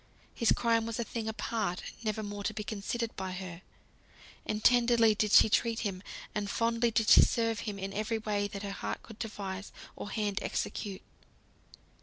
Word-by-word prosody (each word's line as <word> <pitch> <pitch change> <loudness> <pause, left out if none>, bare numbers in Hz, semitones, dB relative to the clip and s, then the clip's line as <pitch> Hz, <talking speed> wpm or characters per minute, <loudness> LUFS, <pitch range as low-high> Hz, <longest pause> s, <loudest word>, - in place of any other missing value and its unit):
His 230 - +2
crime 230 -1 +2
was 230 - -3
a - - +1
thing 225 -1 -4
apart, 220 -4 -2 0.2
never 215 0 -1
more 205 0 -5
to 215 - -1
be 215 - -3
considered 220 +3 -3
by 190 -1 -4
her. 180 -2 -7 0.9
And 215 0 -2
tenderly 235 -2 +5
did 210 0 0
she - - +8
treat 230 +1 +1
him, 195 -4 -3 0.3
and 205 -1 -2
fondly 230 +2 +1
did 220 -1 +1
she - - +10
serve 230 -2 +2
him 205 - -5
in 195 0 -4
every 215 +2 -1
way 210 -2 -1
that 200 0 -7
heart 200 -1 -4
could 225 -1 -12
devise, 205 -3 -5 0.2
or - - -6
hand 205 -1 -1
execute. 195 -2 -3
215 Hz, 175 wpm, -31 LUFS, 200-230 Hz, 0.9 s, she